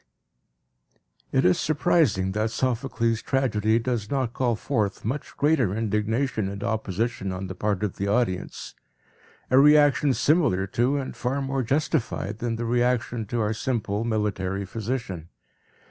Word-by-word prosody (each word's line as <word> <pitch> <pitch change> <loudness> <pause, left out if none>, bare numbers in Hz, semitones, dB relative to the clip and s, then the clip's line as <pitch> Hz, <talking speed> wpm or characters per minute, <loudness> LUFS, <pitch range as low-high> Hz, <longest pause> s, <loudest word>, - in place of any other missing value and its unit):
It - - +2
is 90 - +4
surprising 150 - +2
that 110 +3 0
Sophocles' 115 -1 -1
tragedy 110 -5 +1
does 115 -3 -2
not 130 -4 -1
call 120 -3 +1
forth 105 -4 -2
much 135 +6 -4
greater 140 -10 +2
indignation 110 +1 -1
and 100 +1 -6
opposition 110 -2 -2
on 95 +1 -4
the 95 - -5
part 105 +1 -1
of 105 - -2
the 100 - -2
audience, 100 -3 -1 0.8
a 130 - +6
reaction 145 -2 +5
similar 145 - +2
to, 120 +8 +1
and 135 -2 -4
far 130 +3 -2
more 135 -1 -1
justified, 120 -5 -1
than 120 -1 -2
the 115 +1 -3
reaction 120 -1 0
to 120 +2 -1
our 105 0 0
simple 110 -3 -2
military 100 -4 -1
physician. 105 -6 -4
115 Hz, 140 wpm, -25 LUFS, 105-130 Hz, 0.8 s, a